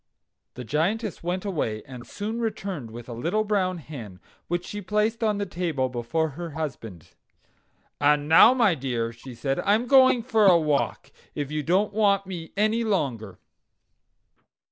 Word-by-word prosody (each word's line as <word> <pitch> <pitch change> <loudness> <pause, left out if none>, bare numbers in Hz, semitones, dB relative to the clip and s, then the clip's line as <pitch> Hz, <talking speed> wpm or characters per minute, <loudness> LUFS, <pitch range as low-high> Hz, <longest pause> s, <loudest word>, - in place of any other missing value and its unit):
The 125 - -6
Giantess 180 - -1
went 180 +3 -3
away, 115 - -2
and 125 -3 -11
soon 220 +3 -4
returned 195 - -4
with 120 +1 -10
a 120 - -6
little 170 - -1
brown 190 -4 0
hen, 120 - -9 0.3
which 175 +1 -2
she 205 - -6
placed 210 +4 0
on 210 -2 +1
the 205 - -2
table 165 -8 -2
before 125 +7 -1
her 165 +2 -7
husband. 115 - -6 0.9
"And 145 0 +3
now, 165 +10 +7
my 230 -7 +4
dear," 120 -5 -3
she 120 +2 -11
said, 135 +3 -2
"I 205 - +3
am 230 +3 -1
going 260 -2 +5
for 220 -4 +3
a 180 -2 +7
walk, 150 -3 -1 0.2
if 145 0 -4
you 155 0 -1
don't 190 +7 +1
want 200 -2 +2
me 175 -3 -7
any 215 +3 +2
longer." 125 - -2
170 Hz, 165 wpm, -25 LUFS, 135-210 Hz, 0.9 s, now